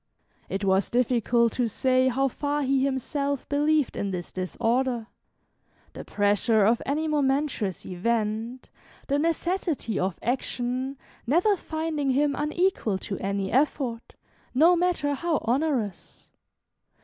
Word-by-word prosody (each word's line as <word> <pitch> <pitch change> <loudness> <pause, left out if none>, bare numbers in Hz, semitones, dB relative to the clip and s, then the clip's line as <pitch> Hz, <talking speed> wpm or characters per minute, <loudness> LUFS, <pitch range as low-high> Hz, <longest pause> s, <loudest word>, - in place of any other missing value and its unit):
It 195 +1 -2
was 190 0 +2
difficult 240 -1 +2
to 245 -2 0
say 255 +3 +2
how 270 +2 +2
far 290 +3 -2
he 270 0 +2
himself 275 +1 -2
believed 295 0 +1
in 200 - -2
this 180 -2 -5
disorder, 235 +6 -1 0.9
the - - -7
pressure 205 +1 +2
of 230 +3 +3
any 305 +3 0
momentous 275 - 0
event, 220 +5 -2 0.4
the 280 +1 +2
necessity 330 - -1
of 185 -1 -1
action, 255 +2 -2 0.3
never 360 - +3
finding 315 -4 -3
him 285 +2 +2
unequal 300 - 0
to 195 0 -5
any 195 0 -2
effort, 260 -3 0 0.4
no 330 +6 +6
matter 345 -5 +1
how 325 +3 0
onerous. 245 - -2
260 Hz, 120 wpm, -26 LUFS, 225-295 Hz, 0.9 s, no